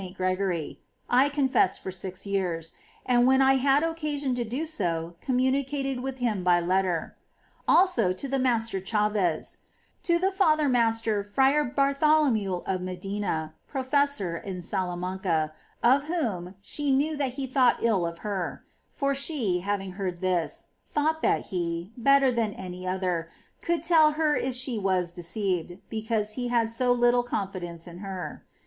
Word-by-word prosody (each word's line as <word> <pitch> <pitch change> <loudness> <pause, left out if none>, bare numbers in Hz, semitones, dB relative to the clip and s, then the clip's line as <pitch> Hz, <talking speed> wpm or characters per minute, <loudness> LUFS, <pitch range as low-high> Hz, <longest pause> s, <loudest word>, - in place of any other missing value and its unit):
Gregory, 185 -3 -1 0.3
I 260 +4 +5
confessed 270 -9 +2
for 190 - -6
six 185 +1 -4
years, 180 -5 -2 0.3
and 245 0 +4
whenever 265 0 +5
I - - +5
had 275 +3 +3
occasion 300 -5 -2
to 245 -1 -1
do 250 +8 -3
so 175 - -2
communicated 270 +1 0
with 265 +1 -4
him 225 -7 -1
by 175 -1 +4
letter; 180 -1 0 0.5
also 255 - +4
to 185 +10 -4
the 270 0 -1
Master 230 -6 0
Chaves; 210 -5 0 0.4
to 340 -1 +2
the 380 +3 +1
Father 310 -6 +3
Master 225 -4 +2
Fra 270 +8 +3
Bartholomew 275 - +2
of 185 -1 -1
Medina, 185 -3 -3
professor 265 - 0
in 180 0 -6
Salamanca, 180 -3 -1 0.3
of 270 +4 +4
whom 210 - -2
she 290 +5 -2
knew 285 +4 +2
that 275 -4 -1
he 270 0 -3
thought 255 -2 +2
ill 215 -6 +2
of 170 0 -4
her; 195 -4 -3 0.3
for 275 0 -1
she, 270 - 0
having 195 0 -2
heard 185 -2 -4
this, 180 -3 -1
thought 315 +2 -1
that - - +2
he, 170 +1 -2
better 275 +2 +4
than 230 -3 0
any 185 -1 -7
other, 180 -3 -1 0.3
could 335 -2 -1
tell 320 -3 +5
her 305 -1 +1
if 260 -1 -1
she 255 -3 -1
was 185 -3 0
deceived, 180 -1 -2
because 220 -1 -1
he 245 +2 -3
had 230 -2 +1
so 250 +2 +2
little 245 0 +4
confidence 185 -7 -4
in 175 -1 -10
her. 190 -2 -6
225 Hz, 150 wpm, -27 LUFS, 185-270 Hz, 0.5 s, I